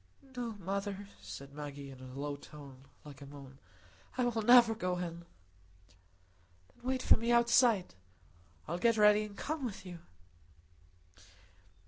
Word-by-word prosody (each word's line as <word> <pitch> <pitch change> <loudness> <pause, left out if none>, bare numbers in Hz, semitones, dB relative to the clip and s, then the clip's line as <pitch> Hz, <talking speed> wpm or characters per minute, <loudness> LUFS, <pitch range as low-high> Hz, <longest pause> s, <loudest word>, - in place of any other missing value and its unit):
"No, 240 -2 -3
mother," 200 +1 -4
said 100 +8 -9
Maggie, 140 -1 -7
in 130 - -12
a 130 +1 -9
low 145 0 -3
tone, 140 -2 -13 0.2
like 145 -1 -11
a 140 - -9
moan. 135 -1 -12 0.6
"I 250 - +2
will 235 -2 0
never 235 0 +7
go 180 -4 -2
in." 170 -1 -5 1.5
"Then - - -25
wait 255 0 -1
for - - +6
me 230 +2 -1
outside. 235 -4 +4 0.7
I'll 170 +2 -3
get 230 +2 +3
ready 210 0 +6
and 205 -1 -9
come 310 -1 -3
with 220 -6 -5
you." 175 -2 -8
190 Hz, 140 wpm, -33 LUFS, 145-230 Hz, 1.5 s, never